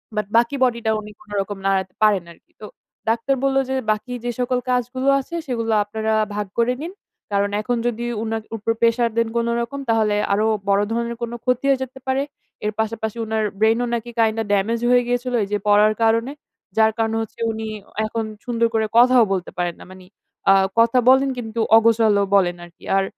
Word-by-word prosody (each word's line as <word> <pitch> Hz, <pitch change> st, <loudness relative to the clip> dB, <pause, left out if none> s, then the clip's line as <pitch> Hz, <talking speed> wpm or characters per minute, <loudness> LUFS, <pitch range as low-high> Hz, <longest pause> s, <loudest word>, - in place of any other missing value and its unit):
But 210 Hz, -1 st, -1 dB
বাকি 240 Hz, +4 st, +2 dB
body 245 Hz, -2 st, +2 dB
টা 220 Hz, -, +3 dB
উনি 210 Hz, 0 st, -9 dB
কোনরকম 205 Hz, -1 st, -4 dB
নাড়াতে 190 Hz, -1 st, 0 dB
পারেন 205 Hz, -4 st, +4 dB
আরকি। 170 Hz, -, -21 dB
তো -, -, -7 dB, 0.4 s
ডাক্তার 230 Hz, +4 st, +1 dB
বলল 270 Hz, 0 st, +2 dB
যে, 265 Hz, -, 0 dB, 0.2 s
"বাকি 215 Hz, +4 st, -3 dB
যে 240 Hz, -, 0 dB
সকল 250 Hz, 0 st, 0 dB
কাজগুলো 250 Hz, +1 st, -1 dB
আছে, 310 Hz, +5 st, -7 dB
সেগুলা 230 Hz, -3 st, -1 dB
আপনারা 220 Hz, +1 st, -2 dB, 0.2 s
ভাগ 210 Hz, -1 st, -2 dB
করে 235 Hz, +1 st, +2 dB
নিন। 340 Hz, +4 st, -6 dB, 0.4 s
কারণ 200 Hz, 0 st, +1 dB
এখন 245 Hz, +3 st, -1 dB
যদি 240 Hz, 0 st, -2 dB, 0.2 s
উনার 225 Hz, 0 st, -3 dB
উপর 220 Hz, +2 st, -1 dB
প্রেশার 230 Hz, 0 st, +3 dB
দেন 230 Hz, 0 st, +2 dB
কোনরকম, 235 Hz, +3 st, -1 dB
তাহলে 220 Hz, -2 st, +2 dB, 0.2 s
আরো 210 Hz, +2 st, +2 dB, 0.2 s
বড় 200 Hz, 0 st, +4 dB
ধরনের 235 Hz, +1 st, -2 dB
কোন 235 Hz, -1 st, -3 dB
ক্ষতি 250 Hz, +1 st, 0 dB
হয়ে 270 Hz, -1 st, +2 dB
যেতে 260 Hz, +1 st, -10 dB
পারে।" 265 Hz, +1 st, +1 dB, 0.4 s
এর 210 Hz, -, +1 dB
পাশাপাশি 220 Hz, 0 st, -2 dB
উনার 220 Hz, 0 st, -1 dB, 0.2 s
ব্রেইন 220 Hz, +2 st, +3 dB
ও -, -, 0 dB
নাকি 235 Hz, 0 st, -3 dB
কাইন্ডা 225 Hz, 0 st, +2 dB
ডেমেজ 210 Hz, +4 st, +1 dB
হয়ে 245 Hz, 0 st, +5 dB
গিয়েছিল, 245 Hz, +1 st, -1 dB
এই -, -, -4 dB
যে 210 Hz, -, +1 dB
পড়ার 210 Hz, +1 st, +5 dB
কারণে। 230 Hz, +3 st, +2 dB, 0.5 s
যার 220 Hz, 0 st, +5 dB
কারণ 225 Hz, -1 st, 0 dB
হচ্ছে, 220 Hz, -, -8 dB
উনি 220 Hz, 0 st, -5 dB, 0.4 s
এখন 225 Hz, +1 st, -3 dB, 0.2 s
সুন্দর 235 Hz, -1 st, +1 dB
করে 220 Hz, -1 st, +1 dB
কথাও 250 Hz, 0 st, +6 dB
বলতে 185 Hz, -2 st, -3 dB
পারেন 175 Hz, -1 st, -1 dB
না। -, -, -11 dB
মানে 185 Hz, -1 st, -14 dB, 0.4 s
অ্যা 195 Hz, -, +7 dB, 0.2 s
কথা 230 Hz, +2 st, +4 dB
বলেন 265 Hz, +1 st, +5 dB
কিন্তু 230 Hz, -1 st, -5 dB, 0.2 s
অগোছালো 225 Hz, -2 st, +4 dB
বলেন 180 Hz, -3 st, +3 dB
আরকি। 170 Hz, -1 st, -18 dB
আর 195 Hz, -, +3 dB
225 Hz, 190 wpm, -21 LUFS, 210-245 Hz, 0.5 s, অ্যা